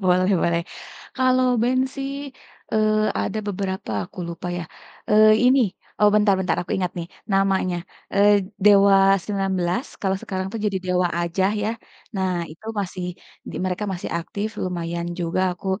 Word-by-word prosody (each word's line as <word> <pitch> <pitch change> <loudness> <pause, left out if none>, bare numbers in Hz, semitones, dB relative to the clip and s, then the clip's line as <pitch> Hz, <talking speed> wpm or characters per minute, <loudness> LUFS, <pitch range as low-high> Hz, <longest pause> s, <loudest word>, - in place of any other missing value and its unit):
Boleh 185 +1 +3
boleh. 170 0 +2 0.6
Kalau 255 0 +3 0.2
band 255 +2 +2
sih, 275 -1 -4 0.6
eee, 215 0 +2
ada 220 - -2
beberapa 190 - -3 0.2
aku - - -19
lupa 170 +1 -6
ya, 175 - -3 0.5
eee 215 +1 +7
ini, 260 +2 +5 0.4
oh 210 - +6
bentar-bentar 195 -4 +3
aku - - -13
ingat 180 -2 -1
nih 170 - -4 0.3
namanya, 195 -2 +2 0.4
eee, 200 +1 +6 0.3
Dewa 200 -1 +7 0.3
19, 195 +2 -1 0.2
kalau 190 -1 +1
sekarang 190 -1 -3 0.2
jadi 195 -2 0
Dewa 180 -1 +1
aja 175 +2 0 0.2
ya. 210 - 0 0.5
Nah 190 -1 0 0.2
itu 160 +7 -14
mereka 200 -2 -2 0.6
di - - -7
mereka 185 +3 -2
masih 180 - -5
aktif, 200 +5 -4 0.2
lumayan 170 -1 -3
juga 170 +2 -1 0.2
aku, - - -10
190 Hz, 145 wpm, -23 LUFS, 180-210 Hz, 0.6 s, eee